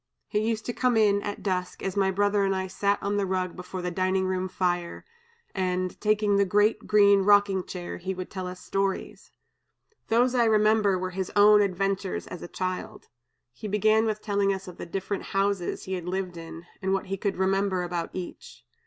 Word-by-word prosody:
He 210 - 0
used 220 0 -1
to 240 - -3
come 250 -2 +1
in, 205 -2 +4
at 205 0 -5
dusk, 180 -2 -2
as 195 0 -2
my 195 -1 +2
brother 205 +1 +2
and 195 0 +1
I 190 0 -1
sat 200 +2 0
on 200 +1 0
the 200 - +1
rug 185 -1 -2
before 180 0 -7
the 180 - -2
dining 185 +1 0
room 185 0 -1
fire, 175 -2 -2 0.5
and, 185 -1 -2
taking 210 -1 +2
the 200 - +4
great 205 +3 +2
green 200 -1 +5
rocking 200 -1 +4
chair, 175 -1 -6
he 190 +2 -4
would 185 0 -7
tell 185 -2 -4
us 180 0 -7
stories. 195 0 -3 0.8
Those 245 +3 +3
I 240 -2 +3
remember 215 -2 +3
were 185 0 -3
his 190 0 -4
own 210 0 +7
adventures, 195 0 -1
as 180 - -8
a - - -6
child. 185 +1 -5 0.4
He 210 - -7
began 215 +2 +3
with 215 -1 -3
telling 200 -2 +1
us 190 0 -4
of 180 - -9
the - - -7
different 195 +3 -3 0.2
houses 195 -2 0
he 190 - -5
had 180 -2 -4
lived 185 -1 -3
in, 165 0 -9 0.2
and 190 0 0
what 195 - -1
he 195 0 -3
could 195 0 -2
remember 190 -1 +1
about 175 -1 -3
each. 180 - -8
195 Hz, 200 wpm, -27 LUFS, 185-205 Hz, 0.8 s, own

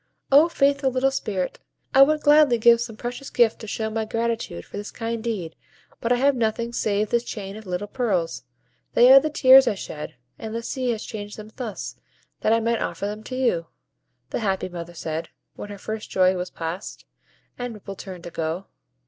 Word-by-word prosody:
"O 295 +5 +7
faithful 280 -3 +2
little 260 +1 +1
Spirit! 195 -8 -3 0.3
I 270 - +7
would 305 +2 +5
gladly 295 -4 +6
give 235 +1 +5
some 230 -2 -5
precious 245 +4 -6
gift 235 -2 +3
to 220 - -8
show 220 +2 -3
my 220 0 -1
gratitude 230 - -3
for - - -12
this 205 +1 -5
kind 230 -1 -4
deed; 195 -9 -3 0.4
but 230 - -2
I - - +6
have 275 +3 +3
nothing 235 0 -1
save 210 -2 0
this 235 0 +2
chain 200 -4 -6
of 215 -2 -10
little 180 +3 -2
pearls: 180 - -1 0.5
they 250 +2 +8
are 275 - +11
the 310 - -2
tears 265 -2 +7
I 210 - +2
shed, 155 -5 -7 0.2
and 220 0 -6
the 230 - -3
sea 255 +1 -2
has 225 -2 -2
changed 205 -2 -7
them 215 0 -10
thus, 235 -6 -6 0.4
that 215 - +1
I 230 - +4
might 230 0 0
offer - - -3
them 210 +1 -4
to 255 - -5
you," 205 -11 +1 0.6
the - - -1
happy 195 -4 -1
mother 170 -1 -8
said, 160 0 -4 0.3
when 205 - -8
her 205 - -7
first 215 +2 -6
joy 185 0 +3
was 180 0 -3
passed, 165 +4 -6 0.5
and 245 -2 -4
Ripple 195 -1 -8
turned 185 -3 -9
to 175 - -8
go. 165 +4 -3
220 Hz, 200 wpm, -24 LUFS, 195-245 Hz, 0.6 s, are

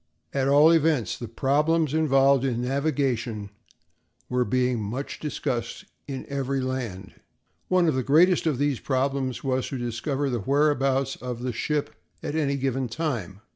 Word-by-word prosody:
At 135 -1 +1
all 145 +3 +6
events, 155 - +2
the 120 - -7
problems 150 +6 +1
involved 135 -4 +4
in 125 -3 -1
navigation 125 -6 -1 0.8
were 125 0 +2
being 125 +1 0
much 120 +7 -5
discussed 130 -6 -3 0.2
in 135 -2 -5
every 140 -1 -2
land. 120 -8 -4 0.5
One 185 -2 +3
of 155 - +3
the 130 - 0
greatest 165 +7 +4
of 150 -5 +1
these 140 -3 0
problems 130 -2 -1
was 130 -1 0
to 135 - -4
discover 125 +4 -2
the 120 - -1
whereabouts 135 +1 +1
of 125 -1 -6
the 125 -1 -2
ship 150 +5 -2 0.3
at - - -3
any 145 -3 0
given 135 -1 -1
time. 115 - -3
135 Hz, 150 wpm, -25 LUFS, 125-145 Hz, 0.8 s, all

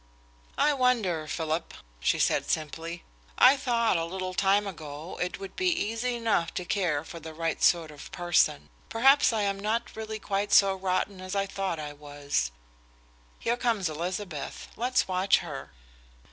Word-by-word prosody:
"I 300 - +4
wonder, 225 - +1
Philip," 160 +1 -2 0.2
she - - +2
said - - +1
simply. 165 +2 -3 0.3
"I 260 +2 +8
thought, 235 -7 +1
a 165 - -1
little 185 +1 -4
time 200 +2 +3
ago, 155 -3 -7
it 180 0 -2
would 195 -1 -8
be 370 - 0
easy 245 - 0
enough 225 -8 +1
to 180 - -3
care 170 -7 0
for 170 +1 -9
the 160 0 -9
right 165 0 -2
sort 165 -3 +3
of 145 -1 -11
person. 175 -4 +1 0.2
Perhaps 270 +5 +5
I 220 -2 0
am 200 -1 -1
not 225 +4 -2
really 220 0 -5
quite 200 -1 -2
so 195 -1 +7
rotten 190 0 -1
as 185 +1 -5
I 195 0 +1
thought 195 -3 -3
I 150 -1 -6
was. 145 - -2 0.9
Here 235 - 0
comes 225 -8 +1
Elizabeth. 175 0 -5
Let's 250 +2 +1
watch 185 +1 +3
her." 135 - -7
185 Hz, 160 wpm, -28 LUFS, 160-220 Hz, 0.9 s, I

